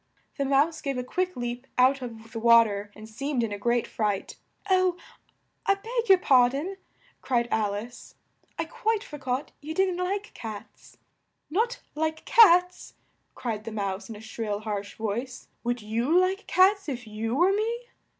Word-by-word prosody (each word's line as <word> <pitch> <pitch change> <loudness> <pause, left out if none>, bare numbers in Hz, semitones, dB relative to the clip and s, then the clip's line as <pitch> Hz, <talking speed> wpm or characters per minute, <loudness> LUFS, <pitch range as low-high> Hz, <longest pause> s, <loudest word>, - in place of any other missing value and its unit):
The 280 - +1
Mouse 285 +4 +2
gave 275 -2 -2
a 250 - -2
quick 365 +8 -2
leap 245 +1 -4
out 260 +2 +4
of 225 -2 -8
the 225 - -5
wa 235 0 +7
ter, 205 -1 -5
and 215 0 -11
seemed 250 +3 -2
in 225 - -2
a 205 - -4
great 240 +2 +1
fright, 205 -3 -2 0.3
"Oh, 370 -2 +3 0.7
I 395 - +5
beg 460 +3 -3
your 385 - +9
par 255 -8 +5
don," 315 +9 -4 0.4
cried 240 -2 +1
Al 210 -2 +1
ice. 235 +4 -9 0.4
"I 325 - -1
quite 435 +6 -1
for 295 - -9
got 260 +1 -3
you 310 +2 -6
didn't 370 -1 +1
like 400 +3 -3
cats." 220 -3 -10 0.5
"Not 465 +8 0
like 315 +1 -2
cats!" 360 -5 +5 0.4
cried 225 -4 -4
the 225 - -6
Mouse 200 0 -3
in 225 - -6
a 210 - -11
shrill, 220 -2 -4
harsh 205 -2 -4
voice. 235 +4 -4
"Would 240 -1 -2
you 235 +10 +1
like 375 +3 +1
cats 390 -1 +4
if 245 -3 -5
you 220 +2 -3
were 355 +6 +4
me?" 455 +3 -1
255 Hz, 175 wpm, -27 LUFS, 225-360 Hz, 0.7 s, your